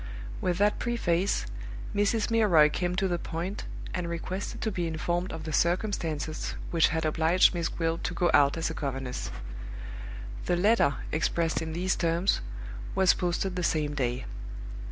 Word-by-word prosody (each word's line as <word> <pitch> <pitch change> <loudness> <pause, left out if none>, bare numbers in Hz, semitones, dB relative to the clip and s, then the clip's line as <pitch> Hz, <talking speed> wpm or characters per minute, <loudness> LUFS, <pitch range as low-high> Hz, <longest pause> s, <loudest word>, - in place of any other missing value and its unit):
With 175 -1 +1
that 205 +2 +3
preface, 195 -6 +1 0.5
Mrs. 205 +2 +2
Milroy 175 -10 +6
came 180 +2 -1
to 195 0 +2
the 175 -2 0
point, 175 +6 -4 0.3
and 175 -2 -2
requested 180 +4 -4
to 220 - 0
be 175 -4 -1
informed 175 +3 -1
of 160 -1 -6
the 155 0 -4
circumstances 165 -4 0 0.2
which 165 -2 +5
had 160 0 -1
obliged 160 +4 +4
Miss 170 -2 -1
Gwilt 165 0 -1
to 175 - -2
go 175 0 +3
out 145 +2 +5
as 165 0 0
a - - -4
governess. 135 -4 -3 1.2
The 175 - +3
letter, 180 - +4 0.2
expressed 165 +1 +1
in 160 -1 -4
these 185 +3 +1
terms, 170 +2 +1 0.5
was 190 -1 +6
posted 180 +1 -1
the 180 - -1
same 150 -3 +1
day. 125 -2 -1
170 Hz, 155 wpm, -29 LUFS, 160-185 Hz, 1.2 s, Milroy